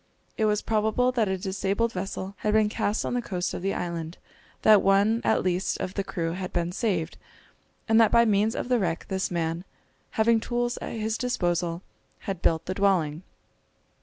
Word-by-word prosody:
It 220 - +1
was 210 -1 +1
probable 220 +3 +1
that 235 -4 +1
a 190 - 0
disabled 195 +4 -1
vessel 190 +1 -4
had 210 - -1
been 215 -1 +4
cast 210 0 -1
on - - -2
the 245 - 0
coast 180 -6 -3
of - - -4
the 195 +1 -1
island, 170 -1 -4 0.5
that 215 -2 +7
one 200 +4 +3
at - - +2
least 185 0 0
of 185 - -4
the 200 - -2
crew 165 -4 -3
had 185 +1 -5
been 175 0 -1
saved, 180 -5 -2 0.7
and 225 +1 +5
that 225 - +5
by 235 0 +5
means 215 +1 +2
of - - -3
the 250 -1 +2
wreck 170 -4 -1
this 190 -1 -1
man, 165 0 -2 0.5
having 225 +1 +4
tools 240 +1 -2
at - - -6
his 220 -1 -2
disposal, 175 -7 -1 0.4
had 190 -3 -4
built 160 0 +1
the 185 - -2
dwelling. 180 -6 +1
195 Hz, 190 wpm, -26 LUFS, 180-220 Hz, 0.7 s, that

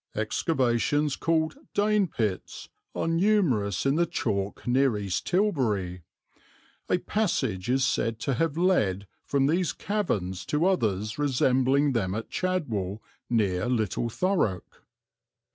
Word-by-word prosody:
"Excavations 130 +4 +1
called 160 -1 0 0.2
Dane 210 -1 +3
pits 110 - -3 0.3
are - - -1
numerous 165 - +2
in 135 +2 +2
the 170 0 +2
chalk 100 -7 -2
near 125 -2 +2
East 100 -3 -3
Tilbury. 115 - 0 0.9
A - - +3
passage 135 - -1
is 130 +1 +3
said 115 -1 0
to 140 - 0
have 160 +4 0
led 105 - +2 0.2
from 140 -1 +1
these 170 +4 +1
caverns 105 - -2
to 150 +3 +1
others 110 - 0
resembling 135 0 +2
them 100 -6 -1
at 110 - -5
Chadwell 115 - -2 0.3
near 100 -5 +1
Little 115 -1 0
Thurrock." 115 - -1
130 Hz, 120 wpm, -27 LUFS, 105-165 Hz, 0.9 s, Dane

